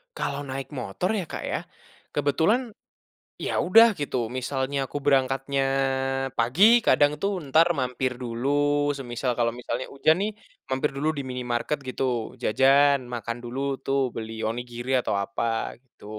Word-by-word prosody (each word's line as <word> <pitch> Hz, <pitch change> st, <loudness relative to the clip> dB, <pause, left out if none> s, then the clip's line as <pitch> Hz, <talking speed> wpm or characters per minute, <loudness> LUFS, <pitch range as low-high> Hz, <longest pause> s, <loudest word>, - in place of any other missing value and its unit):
Kalau 140 Hz, -, -3 dB
naik 135 Hz, 0 st, -5 dB
motor 130 Hz, -, -3 dB
ya 210 Hz, -4 st, -1 dB
Kak -, -, -6 dB
ya, -, -, -2 dB, 0.6 s
kebetulan, 165 Hz, -, +1 dB, 0.7 s
ya -, -, -2 dB
udah 225 Hz, +4 st, +6 dB
gitu 125 Hz, -5 st, -2 dB
misalnya 135 Hz, +2 st, -2 dB
aku 145 Hz, -, -4 dB
berangkatnya 135 Hz, 0 st, +1 dB, 0.8 s
pagi 185 Hz, -, +6 dB
kadang 145 Hz, 0 st, +5 dB
tuh 195 Hz, -3 st, -1 dB
entar 155 Hz, +4 st, +4 dB
mampir 130 Hz, -2 st, -1 dB
dulu 120 Hz, +2 st, -3 dB, 0.5 s
semisal 120 Hz, -1 st, -2 dB
kalau 120 Hz, -1 st, +2 dB
misalnya 120 Hz, +1 st, -4 dB
hujan 155 Hz, +3 st, +3 dB
nih, 210 Hz, -, 0 dB, 0.4 s
mampir 130 Hz, +3 st, 0 dB
dulu 145 Hz, +3 st, 0 dB
di -, -, -2 dB
minimarket 125 Hz, +2 st, -2 dB
gitu 125 Hz, -3 st, -2 dB
jajan, 140 Hz, +4 st, +4 dB, 0.2 s
makan 115 Hz, 0 st, -4 dB
dulu 120 Hz, +2 st, -6 dB, 0.3 s
tuh 135 Hz, 0 st, +1 dB
beli 110 Hz, 0 st, -6 dB
onigiri 120 Hz, +2 st, -5 dB
atau -, -, -2 dB
apa 115 Hz, +3 st, -2 dB
gitu. 130 Hz, -5 st, -22 dB
130 Hz, 140 wpm, -25 LUFS, 120-145 Hz, 0.8 s, udah